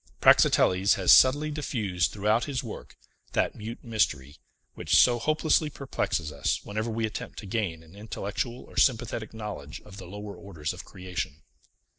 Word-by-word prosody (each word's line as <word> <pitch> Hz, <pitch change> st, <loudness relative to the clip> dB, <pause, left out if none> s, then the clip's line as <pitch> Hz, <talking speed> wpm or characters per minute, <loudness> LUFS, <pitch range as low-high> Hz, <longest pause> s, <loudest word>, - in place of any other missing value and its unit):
Praxiteles 95 Hz, +2 st, +5 dB
has 95 Hz, -3 st, +3 dB
subtly 145 Hz, +4 st, +5 dB
diffused 105 Hz, -, -1 dB
throughout 105 Hz, +3 st, +1 dB
his 135 Hz, -4 st, -3 dB
work -, -, -9 dB, 0.4 s
that -, -, +1 dB
mute 110 Hz, +2 st, -8 dB
mystery, 80 Hz, -, -1 dB, 0.4 s
which -, -, 0 dB
so 120 Hz, -1 st, +6 dB
hopelessly 155 Hz, +3 st, +2 dB
perplexes 105 Hz, -, -3 dB
us 70 Hz, -2 st, -1 dB
whenever 110 Hz, +3 st, -3 dB
we 115 Hz, 0 st, -1 dB
attempt 110 Hz, -, -6 dB
to -, -, -7 dB
gain 95 Hz, -6 st, -2 dB
an 80 Hz, +3 st, -17 dB
intellectual 110 Hz, +3 st, -4 dB
or -, -, -16 dB
sympathetic 115 Hz, -3 st, +1 dB
knowledge 105 Hz, -10 st, -7 dB
of 100 Hz, -2 st, -13 dB
the 95 Hz, -3 st, -9 dB
lower 105 Hz, +2 st, -8 dB
orders 80 Hz, -6 st, -5 dB
of 90 Hz, -, -9 dB
creation. 90 Hz, -6 st, -6 dB
105 Hz, 155 wpm, -27 LUFS, 90-115 Hz, 0.4 s, so